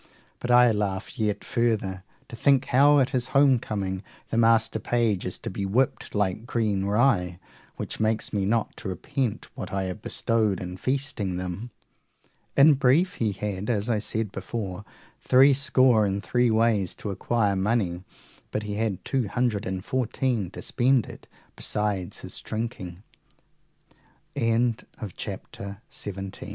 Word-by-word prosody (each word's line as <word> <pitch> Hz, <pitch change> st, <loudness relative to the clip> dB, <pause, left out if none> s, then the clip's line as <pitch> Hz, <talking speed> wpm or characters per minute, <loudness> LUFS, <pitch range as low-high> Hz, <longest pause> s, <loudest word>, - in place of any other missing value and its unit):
But 120 Hz, -, -5 dB
I 120 Hz, -1 st, +7 dB
laugh 105 Hz, +3 st, -3 dB
yet 105 Hz, -2 st, 0 dB
further 105 Hz, -6 st, -1 dB, 0.2 s
to 130 Hz, -, -9 dB
think 135 Hz, +2 st, +3 dB
how 145 Hz, +3 st, +5 dB
at 135 Hz, -2 st, +3 dB
his 125 Hz, -1 st, 0 dB
home 135 Hz, -3 st, +5 dB
coming 95 Hz, -4 st, -3 dB, 0.3 s
the -, -, -1 dB
master 115 Hz, -1 st, +3 dB
page 110 Hz, -6 st, 0 dB
is 90 Hz, -, -4 dB
to -, -, -6 dB
be 100 Hz, -, -4 dB
whipped 115 Hz, +7 st, 0 dB
like 105 Hz, +2 st, 0 dB
green 105 Hz, -5 st, 0 dB
rye, 100 Hz, -5 st, +2 dB, 0.4 s
which -, -, -5 dB
makes 110 Hz, 0 st, 0 dB
me 100 Hz, -2 st, +1 dB
not 110 Hz, +3 st, 0 dB
to -, -, -7 dB
repent 105 Hz, +6 st, -3 dB
what -, -, -6 dB
I 95 Hz, 0 st, -1 dB
have 90 Hz, -2 st, -5 dB
bestowed 110 Hz, -4 st, +1 dB
in 90 Hz, 0 st, -6 dB
feasting 130 Hz, -7 st, -2 dB
them. 90 Hz, +6 st, -5 dB, 0.9 s
In 145 Hz, +2 st, +8 dB
brief, 145 Hz, +8 st, +3 dB
he 110 Hz, -2 st, +2 dB
had, 100 Hz, +1 st, -4 dB
as 110 Hz, 0 st, 0 dB
I 110 Hz, -, +1 dB
said 110 Hz, 0 st, -2 dB
before, 95 Hz, -1 st, -5 dB, 0.4 s
three 135 Hz, +2 st, +6 dB
score 130 Hz, -4 st, +4 dB
and 100 Hz, +1 st, -2 dB
three 125 Hz, -1 st, +2 dB
ways 110 Hz, -4 st, +2 dB
to 105 Hz, -, -5 dB
acquire 105 Hz, 0 st, 0 dB
money, 95 Hz, -3 st, 0 dB, 0.5 s
but 105 Hz, -, -3 dB
he 105 Hz, -1 st, -4 dB
had 105 Hz, -4 st, -2 dB
two 130 Hz, -5 st, 0 dB
hundred 115 Hz, -3 st, -1 dB
and 95 Hz, 0 st, -4 dB
fourteen 125 Hz, -5 st, -1 dB
to -, -, -9 dB
spend 130 Hz, -1 st, +2 dB
it, -, -, -12 dB, 0.3 s
besides 105 Hz, -4 st, -2 dB
his -, -, -4 dB
drinking. 110 Hz, -5 st, -5 dB, 1.3 s
Chapter 115 Hz, -3 st, -3 dB
2.XVIII. 95 Hz, -1 st, -5 dB
How -, -, -8 dB
110 Hz, 150 wpm, -26 LUFS, 95-120 Hz, 1.3 s, In